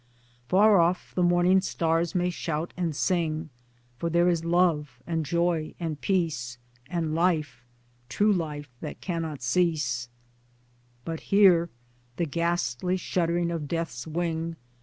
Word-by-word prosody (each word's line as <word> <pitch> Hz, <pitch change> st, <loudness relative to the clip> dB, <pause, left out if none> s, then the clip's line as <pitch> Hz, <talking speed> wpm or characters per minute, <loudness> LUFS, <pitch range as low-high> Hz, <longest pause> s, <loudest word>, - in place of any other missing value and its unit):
Far 200 Hz, +1 st, +5 dB
off 170 Hz, +2 st, +1 dB
the 180 Hz, -, 0 dB
morning 175 Hz, +2 st, +4 dB
stars 165 Hz, -2 st, 0 dB
may 180 Hz, 0 st, +1 dB
shout 165 Hz, -1 st, -3 dB
and 170 Hz, -4 st, -2 dB
sing, 160 Hz, -3 st, -1 dB, 0.5 s
For 170 Hz, -, -1 dB
there 170 Hz, +1 st, +3 dB
is 170 Hz, -2 st, 0 dB
Love 165 Hz, -6 st, +1 dB
and 165 Hz, -2 st, -1 dB
Joy 170 Hz, +1 st, 0 dB
and 160 Hz, -4 st, -4 dB
Peace, 155 Hz, -10 st, -1 dB, 0.3 s
And 165 Hz, -3 st, -1 dB
Life 160 Hz, -7 st, 0 dB, 0.5 s
true 205 Hz, +11 st, +3 dB
life 150 Hz, -6 st, -4 dB
that -, -, -6 dB
cannot 165 Hz, -6 st, -4 dB
cease 125 Hz, -5 st, 0 dB, 1.0 s
But 165 Hz, -1 st, -4 dB
here 185 Hz, -4 st, +5 dB, 0.5 s
the 170 Hz, -, 0 dB
ghastly 170 Hz, 0 st, -1 dB
shuddering 170 Hz, -1 st, 0 dB
of 160 Hz, -3 st, -3 dB
Death's 165 Hz, -5 st, -3 dB
wing. 165 Hz, 0 st, -2 dB
170 Hz, 130 wpm, -27 LUFS, 155-175 Hz, 1.0 s, Far